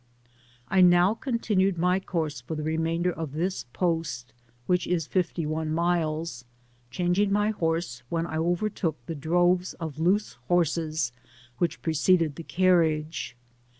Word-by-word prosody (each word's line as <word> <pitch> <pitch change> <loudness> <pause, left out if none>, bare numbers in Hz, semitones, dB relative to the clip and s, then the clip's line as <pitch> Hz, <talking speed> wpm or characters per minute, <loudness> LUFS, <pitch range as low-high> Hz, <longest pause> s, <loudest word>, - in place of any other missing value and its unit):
I 190 +5 +3
now 180 +2 +6
continued 210 -6 0
my 180 +2 +2
coarse 160 -8 -3
for 130 +6 -5
the 155 - -4
remainder 165 +3 0
of 160 -4 -5
this 175 -1 -2
post, 160 -8 -2 0.3
which 180 +2 +1
is 165 -4 0
£fty 175 -3 -1
one 155 +1 -2
miks, 165 -4 -1 0.5
changing 180 +6 +1
my 205 +1 +2
horse 165 - -2
when 165 0 -1
I 160 -2 -4
overtook 175 -1 -1
the 165 - -4
droves 175 +4 +1
of 160 -4 -6
loose 190 - +1
horses 160 -5 +1 0.5
which 175 - -1
preceded 160 -1 +2
the 165 - -7
carriage. 160 -6 +1
170 Hz, 135 wpm, -27 LUFS, 160-180 Hz, 0.5 s, now